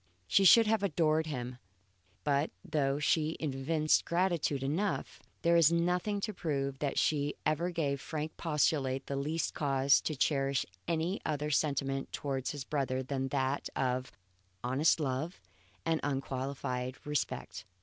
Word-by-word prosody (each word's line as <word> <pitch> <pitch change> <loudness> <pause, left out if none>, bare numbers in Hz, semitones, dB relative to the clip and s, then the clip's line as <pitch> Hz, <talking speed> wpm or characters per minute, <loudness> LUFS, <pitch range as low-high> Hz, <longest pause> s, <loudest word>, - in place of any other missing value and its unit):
She 195 - +4
should 225 +5 +8
have 220 -1 +2
adored 160 -4 +2
him; 125 -3 -5 0.6
but 145 +1 +1 0.2
though 140 -3 +1
she 155 +1 +1
evinced 155 +2 +1
gratitude 170 -6 0
enough, 170 +9 -2 0.2
there 170 0 +4
is 165 -2 +6
nothing 180 +4 +1
to 215 +1 -2
prove 140 -6 -2
that 145 -1 -2
she 145 -1 +1
ever 160 +3 +1
gave 145 -6 -1
Frank 155 0 -4
Postlethwaite 140 -4 0
the 140 - -3
least 150 +4 -1
cause 140 -1 +3
to 155 - -2
cherish 135 -1 +1 0.2
any 170 +3 -1
other 150 -1 -2
sentiment 135 -2 0
towards 135 -2 -2
his 145 -4 -4
brother 130 -2 -1
than 135 0 -2
that 135 0 -1
of 130 0 -1 0.5
honest 135 +7 +3
love 150 +4 -2 0.5
and 165 -1 +1
unqualified 135 -2 -3
respect. 150 0 -3
145 Hz, 140 wpm, -32 LUFS, 135-160 Hz, 0.6 s, should